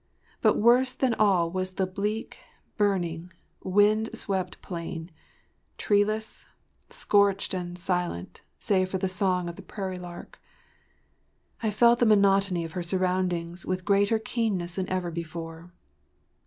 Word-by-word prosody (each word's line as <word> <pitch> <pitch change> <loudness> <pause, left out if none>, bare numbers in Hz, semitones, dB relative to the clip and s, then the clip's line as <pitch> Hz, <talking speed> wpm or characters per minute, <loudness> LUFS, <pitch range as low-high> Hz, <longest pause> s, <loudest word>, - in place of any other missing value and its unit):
But - - +4
worse 250 +3 +4
than 260 -3 +1
all 190 -6 +3
was 185 0 -3
the 190 - +1
bleak, 205 +4 -4 0.4
burning, 180 -4 0 0.3
wind 210 +3 +3
swept 190 -4 -3
plain—treeless, 185 +5 -3 0.5
scorched 200 -2 +2
and 175 -1 -4
silent 180 - -3 0.2
save 185 -2 +1
for 190 - -1
the 190 +1 -1
song 185 -1 0
of 170 - -7
the - - -8
prairie 190 -2 -5
lark. 175 -1 -10 1.2
I 220 - +1
felt 235 +3 +4
the 240 - +4
monotony 195 -4 +3
of 165 - -7
her 180 - -4
surroundings 180 -1 -1
with 185 0 -3
greater 200 +2 +3
keenness 215 -6 -2
than 190 0 -3
ever 185 -2 -2
before. 165 +1 -7
185 Hz, 130 wpm, -27 LUFS, 175-205 Hz, 1.2 s, But